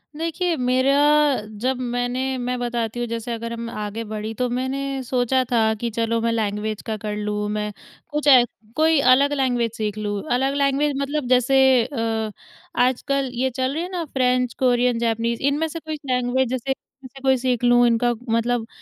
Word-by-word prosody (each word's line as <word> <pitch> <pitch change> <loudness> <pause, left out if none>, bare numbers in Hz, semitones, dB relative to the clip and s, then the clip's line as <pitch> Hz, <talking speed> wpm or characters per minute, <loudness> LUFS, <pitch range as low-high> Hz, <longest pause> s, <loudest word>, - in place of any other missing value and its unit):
देखिए, 335 +2 -1
मेरा 255 +1 +2 0.7
जब 260 +1 0 0.2
मैंने 255 +2 -1
मैं 250 0 -2
बताती 240 -1 -2
हूँ 240 - -2
जैसे 230 +1 -4
अगर 230 0 -5
हम 230 0 -5
आगे 210 0 -5
बढ़ी 215 +1 -4
तो 250 +3 -1
मैंने 265 +2 -2
सोचा 255 +1 +1
था 220 -2 +3
कि 235 - -2
चलो 230 +1 0
मैं 230 0 +1
लैंग्वेज 215 -1 -2
का 220 - -4
कर 210 0 -4
लूँ 210 0 -2
मैं 210 0 -2 0.4
कुछ 295 0 -2
ए, 255 -3 +8 0.3
कोई 315 0 +4
अलग 280 +2 +3
लैंग्वेज 245 -4 0
सीख 215 -1 -2
लूँ। 205 -1 -2
अलग 270 +2 +1
लैंग्वेज 280 +1 +1
मतलब 280 -1 -2
जैसे 255 +1 +3 0.3
अ, 225 -4 -2 0.5
आजकल 265 +2 +1
ये 255 +2 0
चल 260 +1 -2
रही 320 - -2
है 360 - -5
ना 355 -2 -2
फ्रेंच, 250 -3 +1
कोरियन, 245 -2 +2
जैपनीज़ 230 0 -1
इनमें 295 +3 +1
से 330 +2 -6
कुछ 315 -1 -5
लैंग्वेज 250 +1 +1
जैसे 260 +1 -2
इनमें 270 0 -8
से 270 - -12
कोई 265 -1 +3
सीख 250 -1 -1
लूँ। 245 0 +5
इनका 240 +1 +2 0.2
मतलब 230 0 0
245 Hz, 180 wpm, -22 LUFS, 230-270 Hz, 0.7 s, ए